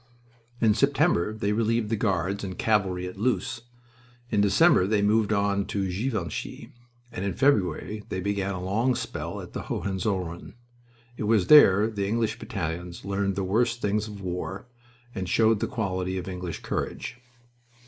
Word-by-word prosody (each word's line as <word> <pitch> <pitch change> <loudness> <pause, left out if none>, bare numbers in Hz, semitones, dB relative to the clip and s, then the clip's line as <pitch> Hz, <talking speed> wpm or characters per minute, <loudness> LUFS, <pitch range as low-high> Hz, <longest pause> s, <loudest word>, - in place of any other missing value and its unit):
In 110 -2 +4
September 140 - +2
they 110 -1 -2
relieved 115 0 0
the - - +3
Guards 100 -2 -1
and 95 -2 -5
cavalry 95 -4 +1
at 90 +2 -8
Loos; 120 0 -1 0.7
in 105 -3 +3
December 100 - +5
they 105 -1 +2
moved 105 +1 +2
on 100 -1 +1
to 100 -1 -2
Givenchy, 100 - -4 0.4
and 95 - -5
in 100 - -1
February 105 - +1
they 95 - -3
began 100 0 -1
a 90 - -5
long 115 +7 +1
spell - - -5
at - - -11
the - - -6
Hohenzollern. 95 -3 -3 0.6
It - - -3
was 105 -4 +3
there 105 -9 +7
the 100 -3 -2
English 110 +1 -1
battalions 85 -2 -5
learned 100 0 -1
the 100 - -1
worst 115 +5 +1
things 105 0 0
of 105 -2 -9
war 95 +3 -4 0.5
and 95 -1 -4
showed 110 +2 +3
the - - -1
quality 95 -4 -2
of 90 - -5
English 90 -2 -5
courage. 115 - -4
100 Hz, 160 wpm, -26 LUFS, 95-110 Hz, 0.7 s, there